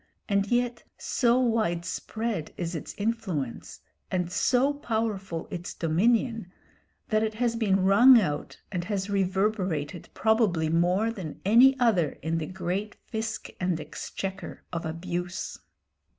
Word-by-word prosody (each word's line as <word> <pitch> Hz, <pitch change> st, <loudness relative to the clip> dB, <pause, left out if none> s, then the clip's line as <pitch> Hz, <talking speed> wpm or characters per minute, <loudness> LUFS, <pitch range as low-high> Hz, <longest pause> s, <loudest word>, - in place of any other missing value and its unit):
And 200 Hz, -1 st, +1 dB
yet 240 Hz, +1 st, 0 dB
so 245 Hz, -1 st, +2 dB
widespread 220 Hz, -3 st, -1 dB
is 170 Hz, -1 st, -3 dB
its 160 Hz, -, -6 dB
influence, 200 Hz, -, -3 dB, 0.3 s
and 180 Hz, -2 st, -1 dB
so 260 Hz, +8 st, +2 dB
powerful 220 Hz, -, -2 dB
its 175 Hz, 0 st, -5 dB
dominion, 220 Hz, +4 st, +1 dB, 0.6 s
that 215 Hz, -1 st, +2 dB
it 220 Hz, -1 st, -1 dB
has 235 Hz, 0 st, 0 dB
been 200 Hz, -4 st, +2 dB
rung 235 Hz, +6 st, +8 dB
out 150 Hz, -8 st, -3 dB
and 175 Hz, -3 st, -2 dB
has 200 Hz, 0 st, -2 dB
reverberated 190 Hz, -5 st, -1 dB
probably 215 Hz, -8 st, +2 dB
more 180 Hz, +7 st, +2 dB
than 185 Hz, -9 st, -7 dB
any 250 Hz, +6 st, +6 dB
other 195 Hz, -, +2 dB
in 165 Hz, +1 st, 0 dB
the 155 Hz, -, -4 dB
great 190 Hz, +3 st, -3 dB, 0.2 s
"fisc 220 Hz, -1 st, -3 dB
and 180 Hz, -3 st, 0 dB
exchequer" 190 Hz, +5 st, -6 dB
of 165 Hz, -1 st, -2 dB
abuse. 175 Hz, +2 st, -4 dB
195 Hz, 125 wpm, -27 LUFS, 175-225 Hz, 0.6 s, rung